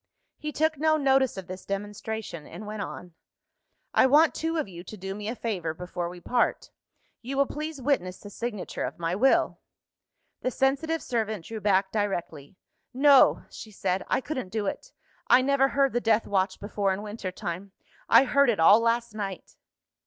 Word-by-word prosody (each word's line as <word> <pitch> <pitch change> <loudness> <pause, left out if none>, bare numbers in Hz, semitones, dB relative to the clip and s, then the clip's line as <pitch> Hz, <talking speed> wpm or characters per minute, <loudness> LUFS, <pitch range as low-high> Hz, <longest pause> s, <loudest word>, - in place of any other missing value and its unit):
He 300 - -4
took 315 0 0
no 310 0 +3
notice 270 -5 +2
of 190 - -6
this 185 +1 -8
demonstration, 205 -3 -5
and 215 - -9
went 210 0 -5
on. 180 -3 -7 0.8
"I - - +5
want 300 +4 +5
two 325 +1 -2
of 310 - -1
you 175 -2 -10
to 215 +4 -10
do 195 0 -5
me 205 +1 -6
a 230 - -3
favour 180 -10 -3
before 175 0 -4
we 175 0 -10
part. 245 +7 0 0.5
You 270 +3 -5
will 280 - +4
please 305 +1 -5
witness 210 -10 -1
the 205 - -11
signature 220 -3 -4
of - - -4
my 170 +1 -1
Will." 265 +7 +3 0.8
The - - 0
sensitive 280 +5 0
servant 220 -6 -2
drew 220 -1 -6
back 195 -1 +2
directly. 190 -7 -3 0.4
"No!" 275 0 +6
she 220 - -9
said, 190 -2 -2
"I - - +1
couldn't 260 -9 -4
do 215 +1 -2
it. - - -4 0.4
I 255 - +6
never 275 0 +3
heard 275 -1 +1
the 240 - +1
Death 225 -1 +2
Watch 195 -1 0
before 205 -1 -1
in 190 +2 -3
winter 210 -3 -5
time 180 +2 -6 0.4
I - - +8
heard 280 0 +3
it 220 - +1
all 200 +7 +7
last 230 0 0
night." 195 -4 -6
215 Hz, 180 wpm, -27 LUFS, 190-270 Hz, 0.8 s, I